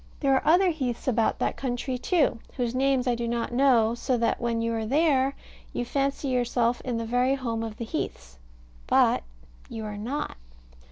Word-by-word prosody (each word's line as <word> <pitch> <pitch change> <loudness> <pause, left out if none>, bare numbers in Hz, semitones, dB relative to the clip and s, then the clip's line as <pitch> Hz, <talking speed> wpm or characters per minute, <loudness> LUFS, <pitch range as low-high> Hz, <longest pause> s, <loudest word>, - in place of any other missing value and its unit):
There 275 -2 +3
are 265 - +3
other 355 +3 +5
heaths 260 -7 -3
about 230 -3 +2
that - - -1
country, 255 0 -2
too, 295 -7 +1 0.2
whose 245 -2 -1
names 265 -1 +2
I 250 - +2
do 235 0 -2
not 235 0 -2
know; 240 -4 +4
so 250 +1 -1
that 230 +1 0
when 235 -1 0
you 230 0 -1
are 225 -1 -1
there, 275 -1 +2 0.4
you 240 - -2
fancy 275 +2 -1
yourself 245 -1 +1
in 245 -2 -3
the 230 - -3
very 250 +3 +2
home 235 -4 -3
of 225 -1 -5
the 235 - -4
heaths: - - -5 0.5
but - - +4 0.5
you 220 -1 -6
are 210 -1 -5
not. 255 - -4
245 Hz, 185 wpm, -26 LUFS, 230-270 Hz, 0.5 s, other